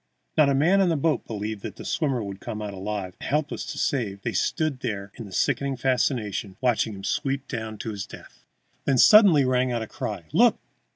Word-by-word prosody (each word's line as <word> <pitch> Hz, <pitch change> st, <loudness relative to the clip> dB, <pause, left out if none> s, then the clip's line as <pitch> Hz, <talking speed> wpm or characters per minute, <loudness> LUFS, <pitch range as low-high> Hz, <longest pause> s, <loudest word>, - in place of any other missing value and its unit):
Not 150 Hz, -2 st, +5 dB
a 140 Hz, -, +2 dB
man 175 Hz, +8 st, +4 dB
on 185 Hz, -, +3 dB
the 165 Hz, -, +2 dB
boat 155 Hz, +1 st, 0 dB
believed 105 Hz, -1 st, -4 dB
that -, -, -6 dB
the -, -, -10 dB
swimmer 135 Hz, -7 st, 0 dB
would 100 Hz, -1 st, -6 dB
come 110 Hz, -1 st, -6 dB
out 105 Hz, -1 st, -5 dB
alive, 95 Hz, -1 st, -4 dB
and, -, -, -6 dB
helpless 150 Hz, +1 st, -1 dB
to -, -, -6 dB
save, 100 Hz, -8 st, -1 dB
they -, -, -2 dB
stood 155 Hz, -5 st, 0 dB
there 100 Hz, -3 st, -4 dB
in 110 Hz, -5 st, -9 dB
sickening 135 Hz, +6 st, 0 dB
fascination, 120 Hz, -6 st, -1 dB
watching 115 Hz, -4 st, +1 dB
him 95 Hz, -, -10 dB
sweep 135 Hz, +6 st, -1 dB
down 110 Hz, -3 st, -5 dB
to 115 Hz, +1 st, -5 dB
his 100 Hz, -2 st, -5 dB
death. -, -, -14 dB, 0.4 s
Then 135 Hz, -, +2 dB
suddenly 195 Hz, -, +7 dB
rang 130 Hz, 0 st, +2 dB
out 120 Hz, -2 st, -1 dB
a -, -, -7 dB
cry: -, -, -5 dB
"Look! -, -, +5 dB
120 Hz, 210 wpm, -25 LUFS, 105-140 Hz, 0.4 s, suddenly